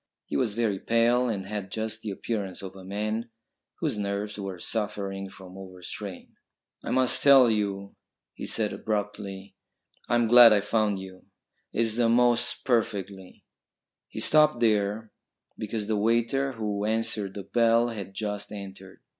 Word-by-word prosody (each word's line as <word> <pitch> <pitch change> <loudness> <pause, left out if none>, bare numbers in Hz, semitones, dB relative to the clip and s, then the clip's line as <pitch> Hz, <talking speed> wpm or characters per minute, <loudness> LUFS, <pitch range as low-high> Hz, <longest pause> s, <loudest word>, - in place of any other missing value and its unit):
He - - -5
was 115 -5 0
very 110 -5 0
pale 120 +3 +2
and 100 -4 -3
had 100 -1 -5
just 110 +2 -3
the 110 - -5
appearance 100 -2 -4
of 95 0 -8
a 95 - -11
man 105 +4 -3 0.5
whose 105 - -1
nerves 100 +1 -3
were 95 -2 -5
suffering 100 -1 -3
from 95 -1 -13
over 95 -2 -11
strain. 100 0 -8 0.5
"I - - -5
must 130 -1 +2
tell 135 -4 +7
you," 100 -2 -2 0.4
he - - -7
said - - 0
abruptly. 100 -2 -4 0.6
"I'm 120 0 +3
glad 120 0 +9
I 105 - +4
found 105 -1 +1
you. 95 -1 -11 0.4
It's 115 0 0
the 120 -1 +3
most 120 0 +2
perfectly 100 -6 -2 0.3
" - - -63
He - - -7
stopped 150 -4 +4
there 105 -1 +1 0.5
because 110 0 -3
the 110 0 0
waiter 115 +5 +1
who 105 -3 -3
answered 110 -2 0
the 100 - -5
bell 115 +1 +3
had 100 -4 -7
just 105 -1 -4
entered. 95 -2 -10
105 Hz, 155 wpm, -27 LUFS, 100-115 Hz, 0.6 s, glad